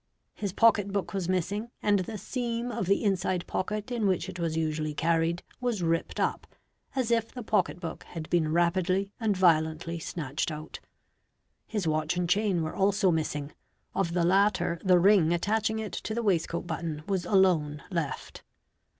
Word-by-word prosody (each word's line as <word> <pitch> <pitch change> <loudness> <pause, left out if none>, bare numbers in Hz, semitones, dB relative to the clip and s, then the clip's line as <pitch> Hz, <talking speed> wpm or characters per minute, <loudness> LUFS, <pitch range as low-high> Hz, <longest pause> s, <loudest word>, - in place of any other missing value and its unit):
His 200 -3 -3
pocket 205 -1 +4
book 195 -2 -2
was 185 -3 -2
missing 200 +5 -1
and 205 -1 +2
the 210 +4 -4
seam 235 +3 -3
of 190 - -3
the 200 +3 +2
inside 185 -3 0
pocket 210 +4 -3
in 230 -4 +1
which 185 -1 0
it 185 -1 -7
was 165 -1 -1
usually 155 -1 -1
carried 165 +2 +1 0.2
was 240 -7 -1
ripped 165 0 0
up, - - -1 0.5
as 255 -3 0
if 230 -1 +1
the 250 - -7
pocket 200 -5 +1
book 165 -3 -6
had 160 -2 -7
been:rapidly 175 +4 +2
and 215 -4 +1
violently 165 -1 +2
snatched 155 -3 -3
out. 155 0 -7 0.9
His 205 -6 -2
watch 155 +2 0
and 180 -1 0
chain 190 -2 +2
were 155 - -4
also 200 -1 +3
missing, 150 -3 -2 0.4
of 170 -3 0
the 170 -1 +2
latter 190 -2 +2
the 185 -2 +5
ring 180 -2 +5
attaching 220 +5 0
it 220 -1 -4
to 220 - -4
the 235 - -1
waistcoat 170 -4 0
button 160 -3 -4
was 190 -3 0
alone 175 -6 +2
left. 165 -7 -3
185 Hz, 165 wpm, -28 LUFS, 165-205 Hz, 0.9 s, the